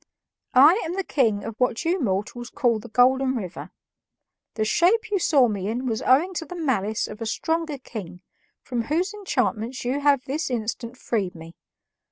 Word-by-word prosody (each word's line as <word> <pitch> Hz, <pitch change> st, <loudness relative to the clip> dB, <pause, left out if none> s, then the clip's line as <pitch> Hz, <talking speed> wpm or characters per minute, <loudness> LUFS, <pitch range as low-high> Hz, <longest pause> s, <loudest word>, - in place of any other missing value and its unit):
"I 310 Hz, -, +7 dB
am 335 Hz, +2 st, -3 dB
the 390 Hz, -, -1 dB
king 225 Hz, -, +1 dB
of 225 Hz, -1 st, -7 dB
what 250 Hz, 0 st, 0 dB
you 355 Hz, +3 st, +1 dB
mortals 225 Hz, +3 st, -2 dB
call 235 Hz, -3 st, +1 dB
the 235 Hz, +2 st, -11 dB
Golden 260 Hz, +3 st, +3 dB
River. 190 Hz, -7 st, -6 dB, 0.9 s
The 215 Hz, -, 0 dB
shape 420 Hz, -, +2 dB
you 400 Hz, -, +2 dB
saw 280 Hz, -7 st, +4 dB
me 200 Hz, -3 st, -3 dB
in 240 Hz, +4 st, -2 dB
was 225 Hz, -3 st, -1 dB
owing 310 Hz, +9 st, +3 dB
to 325 Hz, -, -3 dB
the 360 Hz, -, -7 dB
malice 220 Hz, -, -1 dB
of 210 Hz, +2 st, -10 dB
a 225 Hz, -, -2 dB
stronger 320 Hz, +5 st, -1 dB
king, 195 Hz, -8 st, -9 dB, 0.4 s
from 240 Hz, -3 st, -3 dB
whose 350 Hz, -, 0 dB
enchantments 255 Hz, -, -2 dB
you 260 Hz, +4 st, 0 dB
have 285 Hz, -2 st, +3 dB
this 295 Hz, +3 st, -2 dB
instant 235 Hz, +1 st, -4 dB
freed 200 Hz, -8 st, -2 dB
me. 165 Hz, 0 st, -11 dB
250 Hz, 180 wpm, -24 LUFS, 220-310 Hz, 0.9 s, I